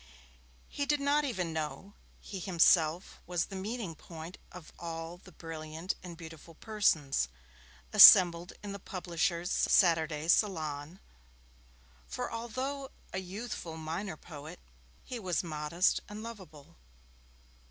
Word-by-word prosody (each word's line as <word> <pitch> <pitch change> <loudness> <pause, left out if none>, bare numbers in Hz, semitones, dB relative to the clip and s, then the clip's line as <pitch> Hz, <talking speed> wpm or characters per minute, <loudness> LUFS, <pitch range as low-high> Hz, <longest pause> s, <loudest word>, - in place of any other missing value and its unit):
He 285 - -3
did 295 0 +2
not 290 +1 +2
even 180 - -2
know 160 +6 -5 0.3
he 200 - -8
was 180 - -6
himself 170 -1 +3
the 180 +2 -2
meeting 200 -1 -4
point 165 +2 -10
of 180 -3 -12
all 165 0 -6
the 185 +1 -16
brilliant 160 +1 -5
and 175 -3 -9
beautiful 165 0 -11
persons, 160 - +1 0.7
assembled 175 -1 +9
in 205 - -5
the 200 - -6
publisher's 175 -1 -2
Saturday 160 -4 +3
Salon, 160 -3 0 1.1
for 65 - -4
although 260 +4 -4 0.2
a 190 - -1
youthful 190 -3 -6
minor 160 +3 -4
poet, 155 +2 -10 0.4
he 250 - -6
was 185 -5 -1
modest 155 +2 +1
and 210 +1 -7
lovable. 190 - -11
175 Hz, 120 wpm, -31 LUFS, 160-200 Hz, 1.1 s, assembled